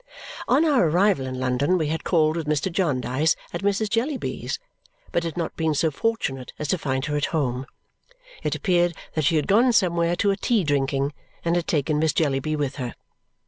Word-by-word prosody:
On 285 +6 +4
our 265 - +4
arrival 175 -5 +2
in 130 0 -4
London, 130 +7 +1
we 155 -3 -1
had 160 +1 -2
called 155 -3 +2
with 165 -3 -3
Mr. 150 +5 0
Jarndyce 145 -4 +1 0.2
at - - -3
Mrs. 200 +2 +1
Jellyby's 245 +6 -2 0.5
but 170 - 0
had 165 -1 -4
not 165 -2 -3
been 160 -2 0
so 160 +2 +2
fortunate 140 - -2
as 150 - -4
to 185 - +1
find 130 -2 -1
her 150 0 -2
at 145 - +1
home. 130 -4 -1 0.7
It - - -1
appeared 175 -3 +2 0.2
that 155 -3 0
she 160 - +3
had 150 - +2
gone 235 +6 +4
somewhere 170 -4 +2
to 200 +3 +2
a - - +1
tea 215 0 +1
drinking 140 -1 0 0.3
and 170 +1 +2
had 175 -2 -1
taken 150 -1 +1
Miss 160 0 +2
Jellyby 150 0 0
with 140 -2 -2
her. 125 -3 -4
160 Hz, 195 wpm, -24 LUFS, 140-185 Hz, 0.7 s, On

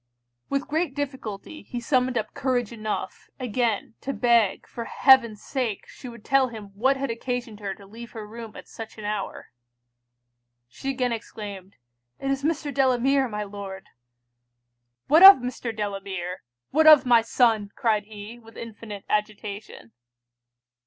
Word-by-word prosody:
With 275 0 -1
great 315 -2 -1
difficulty 265 -2 -5
he 245 - -6
summoned 250 0 +1
up 220 - -3
courage 245 -4 -1
enough, 215 -2 -5
again 235 -3 -1
to 275 - -3
beg 230 -3 +2
for 235 - -7
heaven's 235 -6 +4
sake 245 -7 -3
she 255 - -10
would 235 -2 -13
tell 270 -1 +4
him 215 -4 -9
what 260 +7 +2
had 270 -2 -2
occasioned 235 -2 -4
her 200 -2 -4
to 200 - -15
leave 230 +3 -11
her 220 -2 -7
room 225 0 -9
at - - -11
such 225 0 -9
an 215 - -8
hour? 210 -2 -4 1.2
She 270 - -6
again 255 -2 0
exclaimed, 205 -4 -7 0.4
'it 275 - -2
is 275 0 -1
Mr. 300 -2 -1
Delamere, 265 0 +3
my 210 -2 -4
Lord!' 200 -1 -8 1.2
'What 315 +4 +6
of 390 +1 +13
Mr. 245 -1 -4
Delamere? 195 -4 -4 0.3
what 315 +2 +4
of 300 -4 +9
my 240 -2 +6
son?' 225 -3 +2
cried 215 -3 +1
he, 215 +2 -10
with 225 -1 -16
infinite 215 -3 -8
agitation. 210 - -4
230 Hz, 150 wpm, -25 LUFS, 210-260 Hz, 1.2 s, of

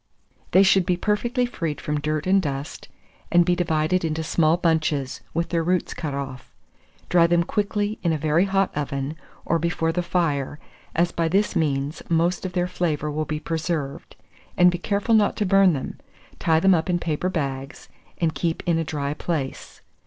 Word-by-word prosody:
They 190 - +6
should 190 -1 +5
be 175 0 0
perfectly 235 +6 0
freed 165 -11 -4
from 150 0 -2
dirt 155 0 -2
and 195 +1 +4
dust, 140 -3 -5 0.4
and 175 0 +5
be 180 0 +2
divided 170 +1 +1
into 160 0 -1
small 160 +1 +2
bunches, 155 -6 0
with 170 +1 -2
their 170 -1 +1
roots 180 +2 0
cut 150 -4 -4
off. 135 -2 -6 0.6
Dry 170 -1 +4
them 170 0 +3
quickly 205 +2 -1
in 170 - +1
a 160 - +1
very 155 +4 +2
hot 195 -1 +1
oven, 140 0 -3 0.3
or 165 - +1
before 165 0 0
the 180 - -1
fire, 155 -6 -1 0.4
as 170 +1 +2
by 165 -1 0
this 195 +4 +1
means 145 -1 -1
most 170 +3 +1
of 180 - -9
their 180 0 0
flavour 155 -4 -1
will 155 +1 -2
be 150 0 -3
preserved, 160 -3 -3 0.4
and 180 0 +6
be 175 - -4
careful 205 +4 0
not 215 -2 +4
to 210 - 0
burn 195 -1 +5
them; 135 - -5 0.4
tie 160 -1 +3
them 190 +3 +5
up 165 +1 0
in 175 - +2
paper 170 +1 -1
bags, 135 -5 -4 0.3
and 165 -2 0
keep 165 -2 -2
in 165 -1 +2
a - - 0
dry 145 -2 -3
place. 150 -4 -4
165 Hz, 185 wpm, -24 LUFS, 150-180 Hz, 0.6 s, They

